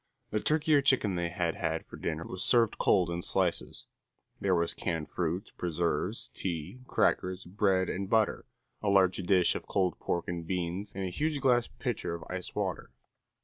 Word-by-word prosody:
The 105 Hz, -, +1 dB
turkey 155 Hz, +5 st, +2 dB
or 145 Hz, -, +6 dB
chicken 130 Hz, -7 st, +3 dB
they 85 Hz, -1 st, -1 dB
had 85 Hz, -2 st, -1 dB
had 80 Hz, -1 st, -2 dB
for -, -, -11 dB
dinner 80 Hz, 0 st, -3 dB
was 95 Hz, -, -4 dB
served 115 Hz, -3 st, +3 dB
cold 90 Hz, -4 st, +3 dB
in 85 Hz, 0 st, -2 dB
slices; -, -, 0 dB, 0.5 s
there 95 Hz, -2 st, +2 dB
was 85 Hz, -1 st, +1 dB
canned 80 Hz, -3 st, -3 dB
fruit, 85 Hz, +2 st, -2 dB
preserves, 85 Hz, -1 st, -1 dB
tea, 90 Hz, +6 st, -4 dB
crackers, 90 Hz, +1 st, +1 dB
bread 95 Hz, 0 st, +2 dB
and 95 Hz, +1 st, -3 dB
butter, 110 Hz, -1 st, +2 dB, 0.3 s
a 105 Hz, -, 0 dB
large 95 Hz, -2 st, +4 dB
dish 90 Hz, -1 st, +3 dB
of -, -, -6 dB
cold 95 Hz, -3 st, 0 dB
pork 85 Hz, -, -2 dB
and 85 Hz, -2 st, -4 dB
beans, 90 Hz, +2 st, -2 dB
and 95 Hz, -, -3 dB
a 90 Hz, -, -3 dB
huge 150 Hz, -, -1 dB
glass 125 Hz, -3 st, +3 dB
pitcher 85 Hz, -, -3 dB
of 85 Hz, -, -8 dB
ice 90 Hz, 0 st, -5 dB
water. -, -, -2 dB
95 Hz, 180 wpm, -30 LUFS, 85-105 Hz, 0.5 s, or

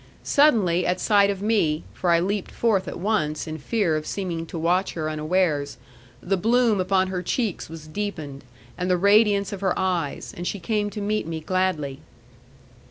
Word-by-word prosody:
Suddenly 210 Hz, -, +3 dB
at 180 Hz, +1 st, 0 dB
sight 200 Hz, -2 st, +4 dB
of 200 Hz, 0 st, -3 dB
me, 185 Hz, -9 st, +1 dB
for 180 Hz, -, -2 dB
I 170 Hz, -1 st, +5 dB
leaped 195 Hz, +2 st, -2 dB
forth 200 Hz, -6 st, +1 dB
at -, -, -5 dB
once, 175 Hz, -6 st, -1 dB
in 155 Hz, -1 st, -6 dB
fear 185 Hz, +1 st, 0 dB
of 155 Hz, 0 st, -3 dB
seeming 170 Hz, -4 st, -3 dB
to 170 Hz, -, -6 dB
watch 180 Hz, +4 st, +1 dB
her 155 Hz, -2 st, -3 dB
unawares, 155 Hz, -3 st, 0 dB, 0.4 s
the 195 Hz, +2 st, 0 dB
bloom 225 Hz, 0 st, +3 dB
upon 185 Hz, 0 st, +1 dB
her 185 Hz, -1 st, -2 dB
cheeks 210 Hz, -1 st, -2 dB
was 160 Hz, -1 st, -9 dB
deepened, 155 Hz, -6 st, -5 dB, 0.4 s
and 180 Hz, +1 st, -1 dB
the 180 Hz, -, +3 dB
radiance 200 Hz, +1 st, +4 dB
of 200 Hz, -, -6 dB
her 190 Hz, -2 st, 0 dB
eyes; 175 Hz, -7 st, -2 dB
and 175 Hz, +1 st, -5 dB
she 200 Hz, -, -3 dB
came 205 Hz, +3 st, -1 dB
to 210 Hz, 0 st, -6 dB
meet 210 Hz, -2 st, -1 dB
me 165 Hz, -1 st, -3 dB
gladly. 160 Hz, -5 st, -1 dB
185 Hz, 180 wpm, -24 LUFS, 160-205 Hz, 0.4 s, I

